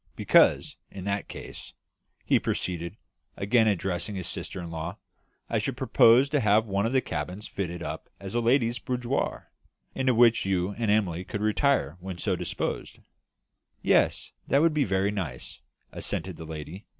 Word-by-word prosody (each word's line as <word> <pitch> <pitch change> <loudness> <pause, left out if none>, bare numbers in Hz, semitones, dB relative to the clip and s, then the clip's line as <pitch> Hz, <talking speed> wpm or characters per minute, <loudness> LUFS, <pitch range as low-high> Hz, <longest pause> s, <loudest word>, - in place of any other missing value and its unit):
Because, - - +4
in 95 - -8
that 100 +1 -2
case," - - -9 0.5
he - - +4
proceeded, 85 +2 -3 0.4
again 110 +3 +3
addressing 95 0 -1
his 95 -2 -4
sister - - -5
in 85 -2 -6
law, 85 +4 -5 0.5
"I - - 0
should - - -3
propose 120 +4 +5
to 150 - +2
have 110 -1 +3
one 100 0 0
of - - -2
the 130 -1 +3
cabins 90 +5 -5
fitted 85 -3 -4
up - - -6
as 95 -1 -7
a 120 - +1
ladies' 120 0 +2
boudoir, 125 0 -2 0.4
into 130 -2 +1
which 115 -1 +5
you 95 0 0
and 110 +1 -2
Emily 95 -5 +1
could 100 +2 -5
retire 110 - +1
when 95 0 -6
so - - 0
disposed." - - -4 0.9
"Yes, - - +2 0.2
that 140 +4 +3
would 165 -1 +4
be 150 -3 +2
very 95 +1 +1
nice," 85 -12 -5 0.3
assented 90 +1 -3
the 80 - -9
lady. 80 +5 -8
100 Hz, 160 wpm, -27 LUFS, 90-115 Hz, 0.9 s, propose